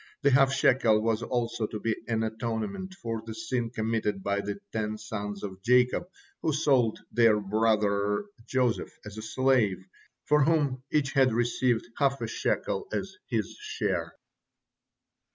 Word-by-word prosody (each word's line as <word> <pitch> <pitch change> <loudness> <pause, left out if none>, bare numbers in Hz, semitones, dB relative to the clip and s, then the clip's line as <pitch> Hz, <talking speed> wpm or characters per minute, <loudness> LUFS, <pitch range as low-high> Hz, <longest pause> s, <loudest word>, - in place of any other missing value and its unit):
The 140 - +5
half 135 0 +5
shekel 125 -4 +4
was 110 0 0
also 120 -2 -1
to 105 - -6
be 115 0 0
an 115 -1 0
atonement 110 - -3
for 115 - -4
the 115 -1 -7
sin 125 -7 -2
committed 110 -4 -1
by 100 0 0
the 100 0 -4
ten 110 -1 -2
sons 105 -2 -5
of 95 -2 -6
Jacob, 125 - +3 0.3
who 160 - +1
sold 135 -7 +3
their 115 -3 +5
brother 105 - +1 0.2
Joseph 125 -3 0
as 105 +1 -8
a - - -5
slave, 110 -5 +1 0.4
for 150 -1 +4
whom 145 -5 +1
each 140 -2 +1
had 135 -4 +4
received 120 0 +1
half 140 -1 +2
a - - -2
shekel 445 -4 -1
as - - -3
his - - -1
share. 430 0 -2
115 Hz, 150 wpm, -28 LUFS, 110-130 Hz, 0.4 s, The